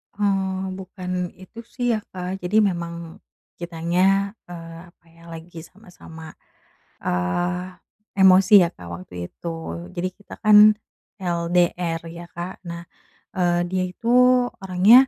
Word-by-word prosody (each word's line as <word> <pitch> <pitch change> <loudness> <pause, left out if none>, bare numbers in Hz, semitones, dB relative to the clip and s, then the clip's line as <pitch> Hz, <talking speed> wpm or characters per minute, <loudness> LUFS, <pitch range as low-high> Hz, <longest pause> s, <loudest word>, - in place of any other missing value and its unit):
Oh 190 -2 -1
bukan 185 -1 -7 0.2
itu 185 +5 -13
sih 245 -1 -3
ya 215 - 0
Kak, 185 +1 -5
jadi 210 +5 +3
memang 170 -1 -4 0.7
kitanya, 180 +4 +1 0.2
eee, 165 -1 -9
apa 170 - -32
ya, 165 0 -21
lagi 165 +1 -10
sama-sama, 165 -5 -13 0.7
eee, 175 - -1 0.4
emosi 190 +1 +6
ya 170 - 0
Kak 85 - -11
waktu 90 +1 -12 0.2
itu. 170 - -7 0.5
Jadi 185 +1 -1
kita 205 - -12
kan 210 -1 +7 0.6
LDR 170 -1 0
ya 170 +1 -9
Kak. 175 +2 -7
Nah, 170 0 -6 0.5
eee, 175 -1 +2
dia 185 0 0
itu 230 +5 -9 0.5
orangnya, 200 +8 +6
180 Hz, 125 wpm, -23 LUFS, 170-190 Hz, 0.7 s, kan